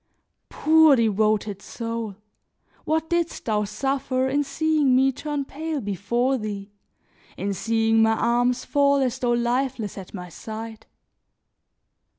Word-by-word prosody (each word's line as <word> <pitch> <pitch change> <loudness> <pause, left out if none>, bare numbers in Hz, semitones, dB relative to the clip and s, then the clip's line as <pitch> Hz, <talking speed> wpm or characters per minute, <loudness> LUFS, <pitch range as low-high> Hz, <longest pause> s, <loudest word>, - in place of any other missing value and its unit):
Poor 315 -2 +5
devoted 215 -3 +1
soul! 230 -3 -5 0.7
What 320 +2 -1
didst 340 -1 -1
thou 210 -2 +1
suffer 265 +2 -1
in 285 +2 +1
seeing 290 -1 +2
me 265 +1 +4
turn 290 +1 -4
pale 310 +2 -4
before 235 +6 -1
thee, 205 -2 -6 0.7
in 200 +2 -2
seeing 225 +2 +2
my 220 0 +4
arms 245 +2 +1
fall 280 -1 +3
as 260 -2 0
though 245 -2 +1
lifeless 240 -3 -1
at 190 - -10
my 180 -2 -7
side! 220 +4 -8
240 Hz, 125 wpm, -24 LUFS, 215-275 Hz, 0.7 s, Poor